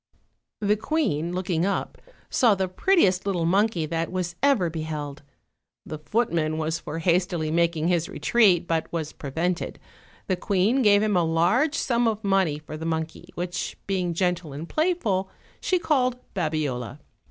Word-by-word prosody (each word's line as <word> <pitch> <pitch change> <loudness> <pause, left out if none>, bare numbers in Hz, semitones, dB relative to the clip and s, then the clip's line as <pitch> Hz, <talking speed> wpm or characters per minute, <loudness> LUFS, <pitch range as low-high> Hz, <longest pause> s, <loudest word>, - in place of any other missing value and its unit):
The 210 0 +2
queen, 190 - -1
looking 180 -2 -1
up, 200 +1 -2 0.3
saw 230 -5 +3
the 190 -1 -1
prettiest 190 - +2
little 175 -4 0
monkey 190 -1 +2
that 165 +2 -2
was 180 -1 -3
ever 275 -11 +3
beheld. 155 -3 -5 0.6
The 155 - -6
footman 160 -4 0
was 160 0 -1
for 150 +1 -6
hastily 170 -2 +1
making 170 -1 +1
his 175 -2 +1
retreat, 195 -8 +3
but 165 -1 -1
was 160 -2 -3
prevented: 165 +5 -2 0.5
the 185 - 0
queen 205 +7 +2
gave 205 -2 +5
him 210 -2 +1
a 175 - +3
large 175 - +2
sum 240 -5 +1
of 220 -1 -1
money 195 -6 +2
for 155 0 -8
the 160 - -7
monkey, 160 +2 -3
which, 175 0 -4
being 180 -3 -1
gentle 175 -4 -1
and 150 +4 -6
playful, 245 - 0 0.3
she 370 - +2
called 255 -7 +1 0.2
Babiola. 150 - -2
175 Hz, 155 wpm, -25 LUFS, 160-205 Hz, 0.6 s, gave